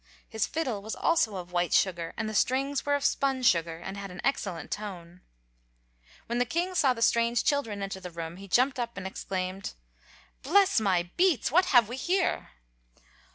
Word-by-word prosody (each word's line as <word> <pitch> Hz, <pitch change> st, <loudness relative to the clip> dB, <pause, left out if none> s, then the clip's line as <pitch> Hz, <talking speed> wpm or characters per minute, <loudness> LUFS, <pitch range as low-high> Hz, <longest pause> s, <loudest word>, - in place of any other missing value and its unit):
His 220 Hz, -2 st, -1 dB
fiddle 260 Hz, -11 st, -2 dB
was 220 Hz, +2 st, -5 dB
also 320 Hz, -11 st, +1 dB
of 180 Hz, -1 st, -7 dB
white 175 Hz, 0 st, 0 dB
sugar, 170 Hz, -3 st, +1 dB
and 225 Hz, -, -2 dB
the 215 Hz, -, -4 dB
strings 270 Hz, +6 st, 0 dB
were 285 Hz, -, +3 dB
of 285 Hz, -, -2 dB
spun 270 Hz, -2 st, +1 dB
sugar 165 Hz, -7 st, +2 dB
and 190 Hz, +4 st, -7 dB
had 200 Hz, 0 st, -6 dB
an 180 Hz, -, -10 dB
excellent 195 Hz, -11 st, -2 dB
tone. 180 Hz, -4 st, -6 dB, 1.0 s
When 235 Hz, +1 st, -2 dB
the -, -, +4 dB
king 345 Hz, +8 st, -1 dB
saw 275 Hz, -8 st, +3 dB
the 230 Hz, -, -1 dB
strange 235 Hz, -1 st, +2 dB
children 225 Hz, -9 st, 0 dB
enter 195 Hz, -1 st, -5 dB
the 180 Hz, -1 st, -7 dB
room 165 Hz, 0 st, -7 dB
he 195 Hz, +1 st, -10 dB
jumped 255 Hz, +7 st, +2 dB
up 235 Hz, -2 st, -4 dB
and 195 Hz, -, -6 dB
exclaimed: 190 Hz, 0 st, -4 dB, 0.7 s
"Bless 395 Hz, -, +4 dB
my 180 Hz, -4 st, +1 dB
beets! 350 Hz, -9 st, +3 dB
What 360 Hz, +5 st, +5 dB
have 245 Hz, -, +5 dB
we 245 Hz, +3 st, -6 dB
here?" 360 Hz, +5 st, 0 dB
220 Hz, 185 wpm, -28 LUFS, 185-270 Hz, 1.0 s, What